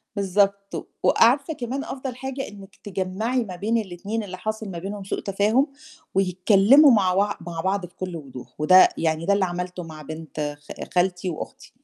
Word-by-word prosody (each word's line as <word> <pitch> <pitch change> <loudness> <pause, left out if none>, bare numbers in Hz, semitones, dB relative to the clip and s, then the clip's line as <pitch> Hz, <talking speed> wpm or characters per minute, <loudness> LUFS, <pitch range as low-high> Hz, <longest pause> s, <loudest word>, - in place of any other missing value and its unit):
بالضبط. 200 0 0
وعارفة 275 +7 +4
كمان 260 +1 -4
أفضَل 260 -2 -5
حاجة 265 +1 -5
إنِّك 200 -2 -12
تجمَّعي 205 +6 -1
ما 190 -5 -7
بين 215 +6 0
الاتنين 205 +2 -3
اللي 185 -2 -7
حاصل 215 +2 -4
ما 170 - -5
بينهم 200 +2 -6
سوء 195 - -3
تفاهم، 210 +8 +2 0.5
ويتكلّموا 195 - +6
مع 195 -5 +3
وع 205 +2 +1
مع 170 -1 -5
بعض 190 +1 0
بكلّ 180 0 -6
وضوح، 135 -5 -9
وده 185 +5 +7
يعني 160 0 0
ده 200 - +3
اللي 200 -1 +2
عملته 180 0 -4
مع 160 -2 -10
بنت 155 -1 -5
خا - - -7
خالتي 180 0 +1
وأختي. 160 - -7
195 Hz, 165 wpm, -24 LUFS, 180-220 Hz, 0.5 s, وده